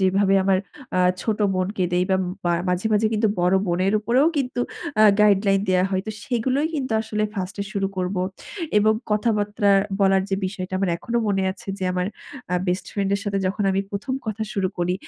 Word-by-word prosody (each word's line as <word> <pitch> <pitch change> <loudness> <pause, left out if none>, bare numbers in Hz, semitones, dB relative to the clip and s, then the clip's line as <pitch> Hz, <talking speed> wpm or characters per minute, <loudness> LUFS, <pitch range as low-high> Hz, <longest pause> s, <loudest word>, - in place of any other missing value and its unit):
যেভাবে 195 +1 +3
আমার 190 -1 +3 0.3
অ্যা 185 - +2 0.2
ছোট 220 -2 -1 0.2
বোনকে 185 0 -1
দেই 180 +1 +2
বা 190 - +4 0.5
মাঝে, 180 +4 0
মাঝে 215 +1 +3
কিন্তু 215 0 +2
বড় 180 +2 +3
বোনের 185 +3 +1
উপরেও 250 +7 +3
কিন্তু 250 -3 -1 0.4
অ্যা 215 - +6 0.2
গাইডলাইন 200 -1 +4
দেয়া 185 0 +3
হয়। 190 0 0
তো - - -2
সেগুলোই 260 +4 0
কিন্তু 260 -6 -2
আসলে 215 -1 -2
1st 190 0 -4
এ - - -6
শুরু 200 -3 0
করব। 185 +1 -2 0.6
এবং 215 +1 +4 0.2
কথাবার্তা 210 -1 +1 0.3
বলার 195 -1 +4
যে 195 - +2
বিষয়টা 185 -1 -6
আমার 195 - 0
এখনো 235 +7 -3
মনে 195 -1 +1
আছে 190 - -16
যে 190 - -3
আমার 180 0 -1 0.4
অ্যা 180 - +1
বেস্ট 180 +1 -1
ফ্রেন্ড 195 -1 -1
এর 200 - -2
সাথে 200 -1 -1
যখন 200 +3 -1
আমি 190 - +1
১ম 205 +6 -3
কথা 220 0 -3
শুরু 190 -2 0
করি। 175 +1 +1
195 Hz, 190 wpm, -23 LUFS, 185-215 Hz, 0.6 s, অ্যা